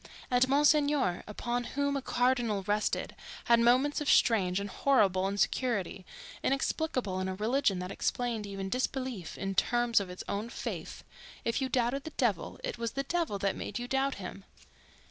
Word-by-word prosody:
And 250 +1 +4
Monsignor, 290 - +3
upon 240 +3 -2
whom 285 0 +1
a 275 - -1
cardinal 245 -5 +1
rested, 210 +2 -1 0.3
had 235 0 +4
moments 255 +6 +3
of 295 - -1
strange 190 -5 +4
and 200 - -3
horrible 195 -4 +2
insecurity—inexplicable 245 - -1
in 185 - -1
a 190 - -3
religion 215 0 +1
that 180 +1 -4
explained 235 -3 -2
even 195 -1 -4
disbelief 250 -4 -3
in 195 0 -2
terms 240 +4 +3
of 195 -2 -5
its 180 - -7
own 210 +3 -3
faith: - - -6 0.4
if 230 +3 0
you 265 - 0
doubted 255 +2 0
the - - -4
devil 215 - 0
it - - -4
was 230 -1 -2
the 275 - -1
devil 330 -8 -1
that 195 0 0
made 205 - -5
you 245 0 -4
doubt 270 +1 0
him. 195 0 -8
235 Hz, 165 wpm, -31 LUFS, 195-265 Hz, 0.4 s, And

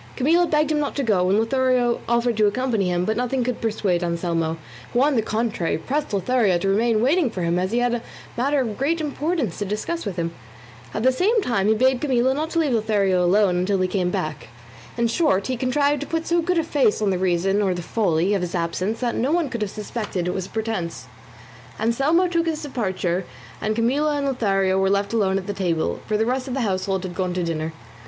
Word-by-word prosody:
Camilla 335 +6 +3
begged 305 -1 +1
him 300 - +1
not 290 - -2
to 280 - -1
go, 185 -6 +2
and 195 - +3
Lothario 250 +1 +2
offered 235 0 +2
to 215 -1 +4
accompany 225 -3 0
him, 175 0 0
but 220 - 0
nothing 250 +2 0
could 250 -1 -3
persuade 200 -6 0
Anselmo, 170 -1 -1 0.4
who 245 - +3
on 290 -1 +2
the 225 - +3
contrary 220 -5 -1
pressed 285 - -2
Lothario 200 -1 +2
to 175 - -2
remain 220 +2 +2
waiting 295 +2 +3
for 185 -5 -4
him 170 +1 +1
as 185 +2 -1
he 235 - 0
had 245 0 +2
a 240 - -1 0.3
matter 275 +4 +1
of 225 -3 -4
great 320 +5 +1
importance 300 - -2
to 205 - -1
discuss 215 - -3
with 200 -4 -4
him. 170 -1 -2 0.6
At 215 - -3
the 260 - +5
same 400 - +2
time 210 -5 0
he 220 - +4
bade 255 +2 +2
Camilla 260 -2 +2
not 310 +3 -2
to 335 - -3
leave 295 -6 +1
Lothario 205 -5 +2
alone 185 0 +3
until 190 +2 +1
he 185 - +2
came 180 -1 0
back. 155 -3 -4 0.5
In 235 - +2
short 230 - +1
he 260 - -1
contrived 285 +4 +1
to 290 - -5
put 325 0 -2
so 345 0 +2
good 360 +1 0
a 330 - +2
face 285 -9 +2
on 210 -2 +1
the 185 - -1
reason, 190 +2 +1
or 190 -3 +1
the 175 - -5
folly, 185 -2 +1
of 200 - 0
his 180 0 -3
absence 185 +6 -2
that 240 -2 0
no 260 +5 0
one 335 -3 +1
could 235 -3 -5
have 210 - -1
suspected 205 -4 -4
it 180 - -1
was 190 -1 -3
a - - -17
pretence. 220 -6 -3 0.7
Anselmo 275 +11 +2
took 335 -1 0
his 315 -1 -2
departure, 190 -9 -2 0.4
and 215 0 -1
Camilla 280 +7 +1
and 285 - -1
Lothario 195 -7 +1
were 190 0 +2
left 200 +2 0
alone 195 -4 +2
at 190 - -4
the 205 - -3
table, 165 - -1
for 215 - +1
the 220 - +1
rest 255 +2 -1
of 255 - -3
the 270 - -1
household 190 -2 -1
had 185 -2 -5
gone 180 -1 -2
to 180 - -1
dinner. 160 -1 -2
220 Hz, 235 wpm, -23 LUFS, 190-265 Hz, 0.7 s, the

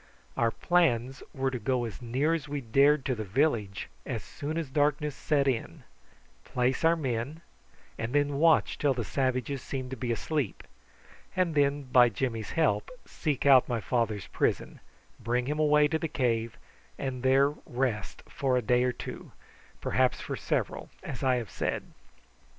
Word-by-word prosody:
Our 115 - +2
plans 135 -5 +1
were 135 0 -1
to 125 - -3
go 125 +2 0
as 110 -2 -7
near 130 +7 +1
as 155 -3 -3
we 145 0 -2
dared 140 +4 +3
to 130 - +1
the 110 -3 -4
village 105 -2 0 0.2
as - - -4
soon 155 +3 -5
as 160 -5 -3
darkness 145 0 +1
set 140 -2 +1
in, 125 -4 -2 0.6
place 125 +4 0
our 165 +1 +5
men, 135 +1 -3 0.6
and 115 +1 -2
then 145 0 +1
watch 165 0 +4
till 140 -3 +2
the 120 - -2
savages 130 +2 -1
seemed 130 -2 -5
to - - -3
be 120 0 -3
asleep, 125 +1 -2 0.7
and 180 -3 +1
then, 145 -1 +2
by 125 -2 +5
Jimmy's 115 0 -3
help, 165 - +1 0.2
seek 150 -6 -2
out 135 -3 +6
my 120 -2 0
father's 110 -3 -1
prison, - - -1 0.4
bring 120 +2 0
him 150 +3 -2
away 150 -1 +5
to 160 - 0
the 165 - -1
cave, 115 -5 -1 0.4
and 130 -2 -4
there 135 +2 +4 0.2
rest 120 -5 -2
for 130 -2 0
a - - +1
day 125 +3 +3
or 125 - +2
two, - - -8 0.5
perhaps - - +1
for - - -4
several, - - -2
as 130 - -6
I 130 -1 +3
have 120 -4 -4
said. - - -2
130 Hz, 165 wpm, -29 LUFS, 120-145 Hz, 0.7 s, out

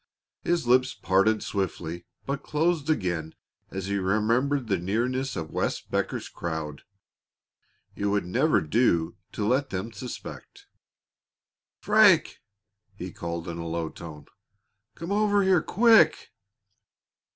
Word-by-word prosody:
His 170 -5 0
lips 130 +2 +3
parted 100 +4 +2
swiftly, 85 -4 -4 0.2
but 140 0 -3
closed 160 0 0
again 85 - -1 0.3
as 95 -1 -5
he 100 +1 -1
remembered 115 +8 +1
the 100 -5 0
nearness 125 +8 -1
of 80 -1 -5
Wes - - -1
Becker's - - -3
crowd. 80 -3 -5 1.1
It 100 - -2
would 100 -2 +1
never 130 - +2
do 85 -2 +1 0.2
to 105 - -2
let 130 +5 +1
them 95 +5 -4
suspect. 125 +1 -9 1.1
"Frank!" 205 -5 +4 0.6
he 90 -2 -7
called 85 -1 -5
in 85 0 -5
a 85 - -5
low 80 -1 -2
tone. 75 -3 -10 0.7
"Come 170 +3 -6
over 205 -1 +3
here 190 -3 +4
quick!" 220 -6 +4
110 Hz, 120 wpm, -26 LUFS, 85-145 Hz, 1.1 s, Frank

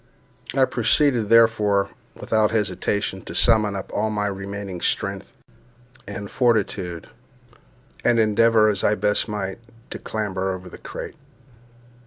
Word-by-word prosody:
I 135 -1 +5
proceeded, 120 -2 +2
therefore, 110 -3 +4 0.2
without 110 -1 +1
hesitation, 105 -3 -1
to - - -8
summon 110 -3 +3
up 95 - -6
all 110 - 0
my 105 -1 -1
remaining 100 -2 -5
strength - - -1 0.8
and 100 0 -6
fortitude, 100 -8 0 1.0
and 120 - +3
endeavour, 110 0 +4
as 105 -2 0
I 105 - +3
best 105 +1 0
might, 105 -1 -4 0.3
to - - -6
clamber 95 -3 -3
over 90 0 -8
the - - -12
crate. - - -8
105 Hz, 125 wpm, -23 LUFS, 100-110 Hz, 1.0 s, I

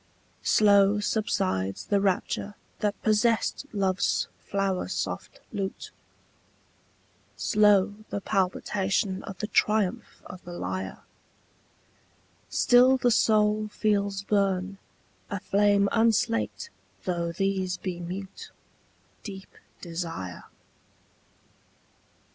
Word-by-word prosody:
Slow 200 -1 +4
subsides 190 - -1
the 200 -1 +1
rapture 200 +1 -1 0.2
that 205 -1 -1
possessed 225 +5 +1
love's 195 -2 0
flower 195 -2 -1
soft - - -4
lute, 195 -2 -4 1.5
Slow 210 -2 +4 0.2
the - - -2
palpitation 190 +1 0
of 190 - -8
the 210 - -3
triumph 210 -2 0
of 185 - -10
the 175 - -9
lyre: 95 - -4 1.5
Still 250 +2 +5
the 245 -1 +2
soul 215 -1 +3
feels 200 -2 0
burn, 195 -1 0 0.5
a 200 - -3
flame 200 +1 +3
unslaked 230 - +1 0.3
though 170 -2 -1
these 190 0 -1
be 180 -2 -5
mute, 185 +3 -7 0.7
Deep 195 -2 -9 0.3
desire. 165 - -5
200 Hz, 90 wpm, -27 LUFS, 185-210 Hz, 1.5 s, Still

